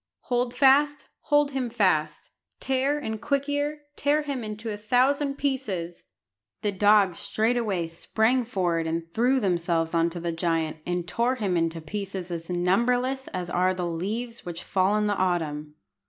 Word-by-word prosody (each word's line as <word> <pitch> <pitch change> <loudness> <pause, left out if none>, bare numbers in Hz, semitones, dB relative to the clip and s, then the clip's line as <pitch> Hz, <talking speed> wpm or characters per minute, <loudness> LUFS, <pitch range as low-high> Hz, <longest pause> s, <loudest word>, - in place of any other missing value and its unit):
Hold 245 0 0
fast, 290 +2 +4
hold 290 -1 +2
him 260 -3 -2
fast; 180 -10 0 0.3
Tear 270 +2 +1
and 220 -7 -4
Quick 280 -1 0
ear, 290 +1 -2
tear 295 +2 +1
him 275 -4 -3
into 215 +1 -5
a - - -3
thousand 270 +6 +2
pieces!" 210 -12 -3 0.6
The 205 - +1
dogs 200 -2 +4
straightway 220 -6 0
sprang 220 +9 +1
forward 175 -8 -1
and 165 +1 -3
threw 250 +4 +3
themselves 170 -5 0
on 165 0 +3
the 170 0 -4
giant, 165 -1 -1
and 175 -1 -2
tore 235 +7 +1
him 200 -7 -1
into 165 -1 0
pieces 190 +1 -5
as 165 0 -5
numberless 245 +9 +1
as 180 -2 -5
are 185 +1 +2
the 180 -1 -2
leaves 215 +8 -4
which 175 -1 -6
fall 190 +2 +2
in 210 - +1
the 205 - +1
autumn. 155 -6 -1
205 Hz, 155 wpm, -26 LUFS, 175-255 Hz, 0.6 s, fast